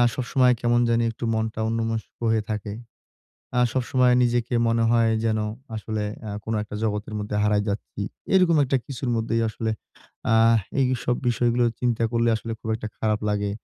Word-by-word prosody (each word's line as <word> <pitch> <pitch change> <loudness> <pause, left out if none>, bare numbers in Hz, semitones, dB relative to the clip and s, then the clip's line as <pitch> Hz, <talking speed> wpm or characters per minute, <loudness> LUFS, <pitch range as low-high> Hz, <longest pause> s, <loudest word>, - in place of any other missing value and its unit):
সবসময় 125 +1 +3
কেমন 120 0 +3
জানি 115 0 +2
একটু 115 - -10
মনটা 110 0 -2
অন্যমনস্ক 115 -1 -2 0.2
হয়ে 110 -1 +2
থাকে। 105 -1 -3 0.9
আ - - +5
সবসময় 125 -1 +2
নিজেকে 120 0 +1
মনে 115 0 +2
হয় 115 -1 +4
যেন 110 -1 +1 0.4
আসলে 110 0 -3 0.3
আ - - -4
কোন 110 - -2
একটা 105 - -8
জগতের 105 0 -2
মধ্যে 105 0 -3
হারায় 105 -1 +2
যাচ্ছি। 100 0 -4 0.3
এরকম 180 -3 +5
একটা 135 +1 +1
কিছুর 130 -2 -4
মধ্যেই 115 0 0
আসলে 110 +1 -3 0.6
আহ 115 +1 +5 0.2
এইসব 125 -1 +1
বিষয়গুলো 120 0 +2 0.2
চিন্তা 120 -2 0
করলে 115 0 +2
আসলে 115 +1 -5
খুব - - -7
একটা 110 - -6
খারাপ 110 -1 0
লাগে। 105 -1 0
115 Hz, 165 wpm, -24 LUFS, 110-120 Hz, 0.9 s, আ